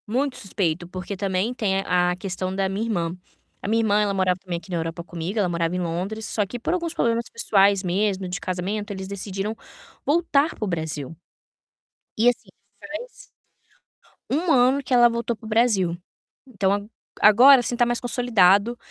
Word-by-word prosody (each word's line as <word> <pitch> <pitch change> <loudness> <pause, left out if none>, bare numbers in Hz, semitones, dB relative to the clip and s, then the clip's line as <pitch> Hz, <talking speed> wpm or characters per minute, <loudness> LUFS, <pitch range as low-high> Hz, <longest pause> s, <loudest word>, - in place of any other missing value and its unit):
Muito 255 +4 -1
suspeito, 175 -4 -2
porque 185 +2 -6
também 195 +4 -1
tem 195 -5 0
a 180 -1 +1
questão 185 -1 -4
da 195 0 0
minha 195 +4 -2
irmã. 175 -6 -2 0.5
A - - -5
minha 225 +2 +2
irmã, 210 -1 +3
ela 205 -1 0
morava 185 -1 +1
também 180 -2 -4
aqui 170 +2 -12
na 175 - -1
Europa 165 +1 -4
comigo, 175 +4 -5
ela 200 -3 +2
morava 170 0 -1
em - - -1
Londres, 180 +6 -3
só 210 -2 -1
que 220 +5 -6
por 250 - -1
alguns 340 -2 -2
problemas 235 -6 0
pessoais 200 -3 +3
mesmo, 190 +1 0
de 180 0 -4
casamento, 200 +4 -3
eles 190 -1 -6
decidiram 200 +2 -4 0.5
voltar 305 -1 +2
para 215 - -3
o - - -4
Brasil. 160 -4 -4 1.0
E, 230 +3 +5
assim, 245 - -4 0.3
faz 315 +12 -9 1.0
1 325 +5 0
ano 265 +1 +4
que 255 - -3
ela 240 -1 +6
voltou 235 0 -2
para 220 - -16
o - - -7
Brasil. 215 -7 +2 0.5
Então 200 -6 0
a 205 - -2 0.5
agora, 255 +5 +8
assim, 240 0 -2
tá 240 - +4
mais 240 0 -1
consolidado 230 -3 +3
200 Hz, 180 wpm, -23 LUFS, 180-235 Hz, 1.0 s, agora